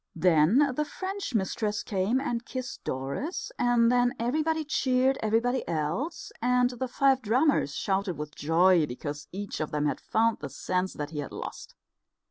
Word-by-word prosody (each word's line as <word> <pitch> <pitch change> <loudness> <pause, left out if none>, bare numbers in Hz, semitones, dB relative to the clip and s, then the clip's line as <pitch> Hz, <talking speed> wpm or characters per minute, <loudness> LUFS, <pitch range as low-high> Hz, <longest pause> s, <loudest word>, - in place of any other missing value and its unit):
Then 180 - +4
the 300 - +1
French 380 - -5
mistress 210 +1 -1
came 200 +5 0
and 240 -4 -2
kissed 255 0 -6
Doris, 140 - -3
and 240 -1 +4
then 245 +1 +2
everybody 310 +7 0
cheered 265 -2 +2
everybody 230 +4 +1
else; 170 - -2
and 250 +1 +3
the 250 +1 -3
five 265 +1 +3
drummers 245 - +2
shouted 195 -3 -1
with 150 0 -6
joy, 165 +1 +3
because 145 +3 -6
each 200 +1 -5
of 155 - -2
them 150 0 -1
had 145 - 0
found 225 +1 +1
the 145 - -6
sense 180 +6 -2
that 150 0 -5
he 150 - -4
had 145 - -5
lost. - - -8
225 Hz, 160 wpm, -28 LUFS, 165-260 Hz, -, Then